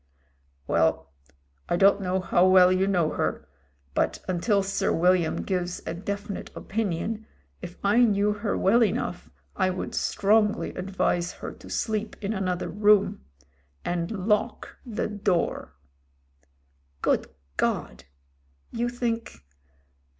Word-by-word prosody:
"Well, 80 +3 +1 0.6
I - - +2
don't 200 +2 +5
know 185 0 0
how 185 0 +3
well 185 -1 +7
you 185 +1 +2
know 175 -5 +2
her; 75 - -2 0.5
but - - 0
until 195 +3 +1
Sir 195 +1 0
William 180 -1 +2
gives 180 -2 -2
a - - -3
definite 200 +3 -5
opinion, 215 +1 -3 0.3
if 175 -1 -8
I 205 +4 +4
knew 210 -3 +3
her 210 0 -2
well 230 +5 +4
enough, 220 - -2 0.3
I 185 -1 +2
would 185 0 -4
strongly 210 +1 +2
advise 180 -2 -1
her - - -7
to - - -14
sleep 220 -1 -2
in 210 +1 -2
another 185 -3 -2
room 205 - +3 0.3
— 70 0 -38
and 170 -1 -1 0.2
lock 210 -1 0
the 235 -3 -3
door!' 200 - -1 1.3
"Good - - +2 0.3
God! 60 +2 -1 0.7
you 240 +1 -1
think 235 - -3
195 Hz, 125 wpm, -26 LUFS, 180-210 Hz, 1.3 s, well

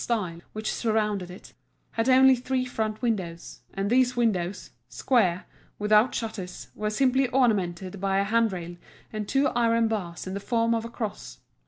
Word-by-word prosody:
style 185 -8 -2
which 215 0 -3
surrounded 210 -5 0
it, 180 - -12 0.4
had 225 +3 0
only 260 0 +7
three 255 +1 -1
front 220 -3 -3
windows, 185 -8 -3 0.2
and 195 +1 -1
these 250 0 +3
windows, 205 -6 -1 0.2
square, 195 -8 +1 0.3
without 210 +3 +3
shutters, 200 -6 -5
were 210 0 -2
simply 260 +4 +2
ornamented 195 -7 0
by 195 -1 +1
a 195 - +3
handrail 200 -5 0 0.4
and 215 -1 -4
two 275 +1 +3
iron 230 -1 +2
bars 185 -6 -4
in 185 - -5
the 200 - -3
form 230 +2 +1
of 225 -1 -1
a 230 - -6
cross. 225 -3 -6
215 Hz, 160 wpm, -26 LUFS, 195-240 Hz, 0.4 s, only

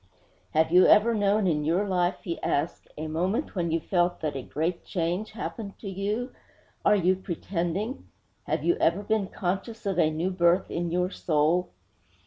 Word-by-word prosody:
'Have 160 +1 +3
you 180 +1 +7
ever 230 +3 +6
known 205 -1 +2
in 155 -4 +1
your 175 +7 +1
life,' 180 -2 0
he 170 -3 -4
asked, 150 +4 -1
'a 155 - -4
moment 175 +7 -1
when 175 -3 -1
you 165 +1 +1
felt 175 +1 0
that 150 -3 -2
a 135 - -3
great 165 +7 -2
change 180 +5 -2
happened 215 -2 -6
to 210 - -9
you? 205 +6 -2 0.5
Are - - +5
you 185 -1 +3
pretending? 190 - -3 0.4
Have - - -1
you 350 - +2
ever 175 +5 +2
been 215 -2 0
conscious 200 +5 -4
of 195 -3 0
a 155 - +4
new 165 +4 -1
birth 180 0 +2
in 170 0 -2
your 180 +1 0
soul?' 160 +2 +1
180 Hz, 175 wpm, -27 LUFS, 170-200 Hz, 0.5 s, you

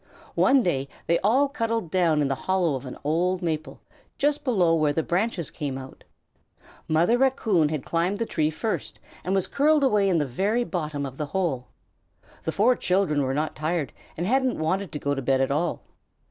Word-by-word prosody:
One 265 -1 +4
day 140 -7 0 0.2
they 170 0 +2
all 255 +8 +3
cuddled 230 - -2
down 165 -5 +3
in - - +1
the 135 - 0 0.2
hollow 185 -5 +2
of 130 0 -5
an 125 - -7
old 175 +5 0
maple, 155 -2 -3 0.4
just 290 +1 +1
below 190 - +3
where 155 -2 +2
the 160 +2 0
branches 180 -2 -1
come 140 -4 -4
out. 130 0 -10 0.8
Mother 170 +10 +3
Raccoon 220 - +2
had 150 -4 -3
climbed 175 +4 0
the 230 - -1
tree 155 -7 0
first 215 +8 -4 0.2
and 190 +2 0
was 190 - +1
curled 300 +1 +3
away 210 -7 +3
in 180 - +2
the 150 - +1
very 200 - 0
bottom 155 -9 -3
of 135 0 -8
the 150 - -3
hole. 135 -10 -1 0.8
The 160 - 0
four 230 +8 +3
children 180 -8 +1
were 135 0 -1
not 155 +2 -1
tired 155 -3 -2 0.2
and 170 - -2
hadn't 260 +3 +1
wanted 185 +4 -1
to - - -4
go 145 -1 -1
to 135 - -3
bed 135 +1 +2
at 135 0 +1
all. 155 +3 -1
170 Hz, 195 wpm, -25 LUFS, 150-210 Hz, 0.8 s, One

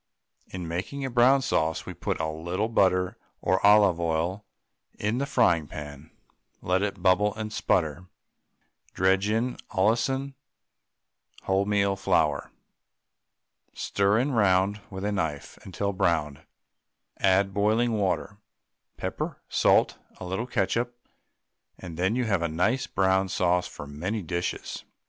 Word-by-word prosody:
In 90 -3 -6
making 95 +12 -4
a 135 - -4
brown 130 +3 +4
sauce 80 -11 0
we - - -6
put - - -3
a 80 - -1
little 85 +7 -3
butter 95 -1 +2 0.2
or 95 +1 0
olive 100 -4 +6
oil 85 +4 -1 0.5
in 105 +4 -1
the 140 - -1
frying 90 - +2
pan; 75 +1 -9 0.5
let 90 +1 0
it 100 -2 -3
bubble 100 +2 +3
and 110 0 -5
sputter, 85 -3 0 0.9
dredge 95 +2 +2
in 115 +3 0
Allinson 120 +7 +1 1.1
wholemeal 100 0 +1
flour, 80 -7 +1 1.3
stir 100 +1 +1
it 125 - +2
round 100 -5 +2
with 95 0 -6
a 105 - 0
knife 80 -8 -3
until 100 +1 -3
browned, 80 -7 0 0.8
add 95 +1 +3
boiling 110 +4 +2
water, 100 0 -1 0.6
pepper, - - -4
salt, - - +3 0.2
a - - -8
little 95 +7 -3
ketchup, 120 +2 -1 0.8
and 85 -3 -9
you 85 - -5
then 95 +5 +2
have 100 -6 0
a 85 - +1
nice 105 +11 0
brown 95 0 +1
sauce 90 0 +1
for - - -9
many 90 +9 -4
dishes. 85 +2 -4
95 Hz, 130 wpm, -26 LUFS, 90-105 Hz, 1.3 s, olive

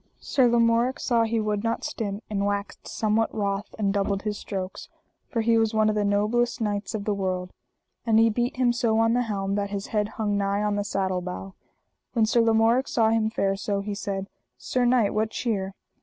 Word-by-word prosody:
Sir 260 -3 +2
Lamorak 235 +3 +2
saw 235 -3 +2
he 225 0 0
would 210 -1 -1
not 230 0 -1
stint, 205 -2 -4
and 200 -2 -2
waxed 200 0 -3
somewhat 220 +1 0
wroth, 200 -1 -2
and 200 -2 +1
doubled 200 -1 0
his 210 -1 -2
strokes, 190 -2 -6 0.4
for 230 - 0
he 230 0 +3
was 225 0 +1
one 215 0 +4
of - - +1
the 210 - +1
noblest 215 +5 +1
knights 210 0 -2
of 205 -2 -4
the 210 - +1
world; 185 -2 -3 0.5
and 225 -2 +3
he 225 0 +6
beat 240 +4 -1
him 250 -2 +3
so 230 -2 +1
on 225 0 +3
the 245 - +2
helm 200 -4 -2
that 200 0 -1
his 200 -1 -4
head 210 -1 +2
hung 205 -2 0
nigh 200 +1 0
on 210 -1 0
the 205 - 0
saddle 190 -2 -1
bow. 180 +2 -6 0.6
When 225 -3 +3
Sir 235 +2 +3
Lamorak 230 +3 +3
saw 225 -2 +2
him 225 -1 +2
fare 195 -3 0
so, 200 0 -2
he 205 +1 -4
said: 195 -1 -4 0.3
Sir 250 -1 0
knight, 240 -4 +3
what 215 +1 0
cheer? 195 -5 -2
215 Hz, 210 wpm, -25 LUFS, 200-230 Hz, 0.6 s, he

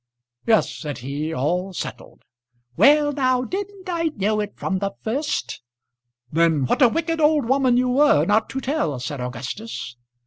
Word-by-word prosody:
"Yes," 220 -2 +4
said 150 -3 -5
he; 145 +4 -3
"all 180 +7 -1
settled." 130 -8 -7 0.5
"Well 295 +1 +5
now! 255 -3 +1
didn't 390 +5 -6
I 340 -2 -1
know 210 +1 0
it 205 -1 -3
from 190 -1 -2
the 200 0 -2
first?" 275 +7 -2 0.7
"Then 160 -3 +2
what 125 - 0
a 250 - +7
wicked 330 +4 -1
old 300 -3 +3
woman 260 -1 +3
you 250 0 +2
were 290 +4 +4
not 215 +2 +2
to 265 - -3
tell," 255 - -1
said 130 +2 -5
Augustus. 125 - -6
225 Hz, 160 wpm, -22 LUFS, -, 0.7 s, a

